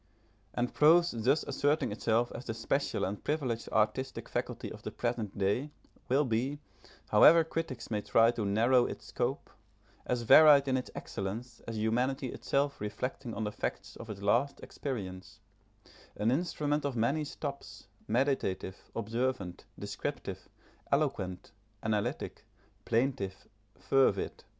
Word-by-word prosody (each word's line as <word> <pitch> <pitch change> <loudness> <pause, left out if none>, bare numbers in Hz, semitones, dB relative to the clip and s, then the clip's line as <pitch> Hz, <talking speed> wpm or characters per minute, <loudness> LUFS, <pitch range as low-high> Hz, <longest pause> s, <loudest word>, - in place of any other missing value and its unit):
And 120 0 -1
prose 170 +3 +5
thus 125 +6 +1
asserting 145 +1 +1
itself 115 +2 +1
as 125 - -7
the 115 - -4
special 135 +5 -1
and 100 +2 -5
privileged 130 -7 -2
artistic 110 +4 0
faculty - - -4
of - - -9
the - - -5
present 120 -5 -3
day, 100 +9 0 0.4
will 140 +4 +3
be, 125 +4 0 0.5
however 165 0 +7
critics 160 -7 -4
may 105 -1 0
try 115 +2 +4
to 115 -2 -3
narrow 115 +5 +3
its - - -7
scope, - - -3 0.6
as 125 -1 0
varied 145 +3 +8
in 130 - +2
its 130 - -2
excellence 110 +5 -5
as 115 -1 -4
humanity 125 +5 0
itself 140 -2 -1
reflecting 115 +3 -4
on 110 - -2
the 105 - -2
facts - - -4
of 115 - -10
its 100 -2 -7
latest 125 +7 +2
experience 95 -9 -6 0.8
an 110 +3 +1
instrument 150 -1 0
of 140 -3 -2
many 135 +7 +1
stops, 140 -10 -7 0.2
meditative, 115 -7 -1
observant, 115 -4 -2
descriptive, - - -5 0.4
eloquent, 120 -11 -1 0.3
analytic, 105 -2 -2 0.4
plaintive, 115 -6 -1 0.3
fervid. 130 -8 +1
120 Hz, 130 wpm, -31 LUFS, 110-140 Hz, 0.8 s, varied